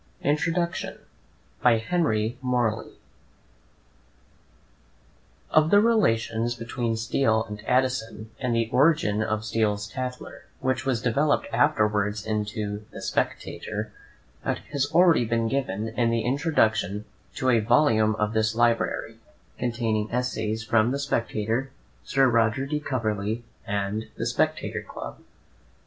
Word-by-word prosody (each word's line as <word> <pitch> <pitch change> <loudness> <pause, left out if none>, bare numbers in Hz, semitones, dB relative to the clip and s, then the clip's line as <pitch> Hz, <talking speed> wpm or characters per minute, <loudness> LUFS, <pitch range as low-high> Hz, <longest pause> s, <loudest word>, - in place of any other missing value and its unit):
INTRODUCTION 165 +4 0 0.6
By 120 -2 +5
Henry 115 -4 0
Morley 120 -4 0 2.6
Of 155 0 +4
the 205 - +6
relations 120 - +2
between 115 -1 -2
Steele 110 -1 +1
and 105 0 -8
Addison, 125 -4 0
and 125 -3 0
the 115 -1 +1
origin 130 -6 +3
of 110 0 -1
Steele's 105 -2 0
"Tatler," 125 +3 -6
which 130 +1 -1
was 120 -4 0
developed 140 +5 +2
afterwards 105 0 +2
into 105 -1 -3
the - - -9
"Spectator," 105 0 -3 0.5
account - - -2
has 145 -1 0
already 175 -7 +5
been 115 0 0
given 115 -5 -2
in 115 +1 +1
the 115 0 +1
introduction 110 - +1 0.3
to 130 -1 +1
a 115 - +4
volume 110 -2 +3
of 105 0 -1
this 110 0 +1
Library, 115 0 +1 0.2
* - - -35
containing 115 -3 -1
essays 115 -3 -1
from 110 +1 +3
the 135 - -1
"Spectator" 115 -2 -1 0.3
"Sir 135 -1 +3
Roger 115 +2 +2
de 150 +2 -2
Coverley 110 -5 -2 0.2
and 100 +2 -2
the - - -2
Spectator - - 0
Club." - - -9
115 Hz, 120 wpm, -26 LUFS, 110-130 Hz, 2.6 s, the